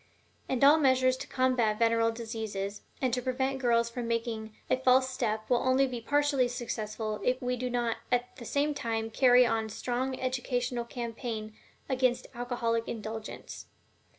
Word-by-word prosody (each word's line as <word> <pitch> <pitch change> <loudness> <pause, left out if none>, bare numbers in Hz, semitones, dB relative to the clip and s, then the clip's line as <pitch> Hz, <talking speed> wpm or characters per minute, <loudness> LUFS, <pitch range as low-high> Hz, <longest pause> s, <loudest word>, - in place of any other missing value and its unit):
And 260 0 0
all 295 +3 +8
measures 260 -2 +4
to - - -7
combat 250 -5 +1
venereal 230 0 +3
diseases 220 -3 -4 0.2
and 255 -2 +1
to 250 - +1
prevent 265 +1 -1
girls 235 -2 +3
from 235 0 -5
making 230 -1 -2 0.2
a - - +3
false 260 0 +4
step 220 -4 -2
will 245 - +3
only 260 +1 +3
be 250 -3 -4
partially 285 0 +2
successful 215 -3 -4
if 255 +1 +1
we 250 0 -1
do 250 +1 -3
not 240 -2 0
at 245 0 0
the 235 - -9
same 290 +4 +1
time 225 -4 -2
carry 250 +1 +6
on 225 -1 0
a - - -7
strong 255 +4 -2
educational 250 -1 -1
campaign 230 -2 -5 0.3
against 255 -2 +1
alcoholic 235 -2 -1
indulgence. 220 -1 -6
245 Hz, 160 wpm, -30 LUFS, 225-255 Hz, 0.3 s, all